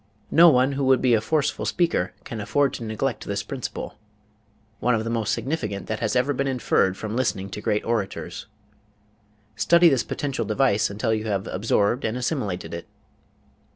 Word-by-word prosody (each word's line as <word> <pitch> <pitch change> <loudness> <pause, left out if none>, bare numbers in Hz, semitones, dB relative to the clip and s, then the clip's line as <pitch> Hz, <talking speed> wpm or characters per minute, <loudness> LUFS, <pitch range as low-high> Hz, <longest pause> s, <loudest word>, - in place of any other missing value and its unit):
No 170 +1 +8
one 130 -2 +3
who 140 0 -2
would 130 0 +5
be 125 -2 +3
a 110 - +3
forceful 150 +5 0
speaker 165 - +1
can 115 -2 -6
afford 140 +7 +1
to - - -5
neglect 115 +3 -2
this 100 0 -2
principle 125 -5 -6 0.8
one 125 0 +2
of 110 - -1
the 115 - -3
most 115 -2 0
significant 110 -9 -3
that 110 0 -3
has 110 +1 -1
ever 130 +3 +2
been 140 +1 -1
inferred 110 -7 +1
from 110 0 -4
listening 100 -6 -1
to 105 - -6
great 105 0 0
orators. 115 -4 -3 1.1
Study 170 0 +5
this 135 -5 +2
potential 140 -4 -3
device 110 -1 +2
until 110 +3 -1
you 110 0 -2
have 100 -3 -1
absorbed 105 +4 0
and 110 +2 -1
assimilated 105 - -3
it. 85 - -6
115 Hz, 175 wpm, -24 LUFS, 105-135 Hz, 1.1 s, No